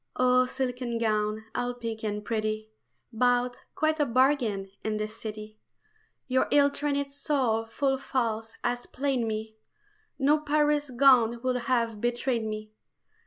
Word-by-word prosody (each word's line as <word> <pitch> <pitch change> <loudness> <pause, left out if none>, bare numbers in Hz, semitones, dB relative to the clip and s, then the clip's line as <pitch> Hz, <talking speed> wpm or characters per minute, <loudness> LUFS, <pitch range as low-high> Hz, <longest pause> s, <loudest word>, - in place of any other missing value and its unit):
OH, 255 0 +4
silken 250 -2 -2
gown, 215 -1 0
all 245 0 -2
pink 230 -2 -5
and 210 -1 -3
pretty, 215 0 -2 0.4
Bought, 245 +1 +2 0.2
quite 310 0 +1
a 295 - +4
bargain, 235 -6 +2
in 215 -1 -1
the 215 0 -1
City, 215 0 -8 0.7
Your 260 0 +2
ill 285 -1 +5
trained 280 -1 -2
soul 255 -6 0
full 270 +3 0
false 225 -4 -2
has 245 0 -2
played 270 -1 -1
me 220 0 -4 0.6
No 295 +2 +3
Paris 295 -1 +1
gown 245 -3 +5
would 255 -1 +1
have 230 -4 0
betrayed 240 0 0
me. 215 0 -5
245 Hz, 135 wpm, -28 LUFS, 220-270 Hz, 0.7 s, ill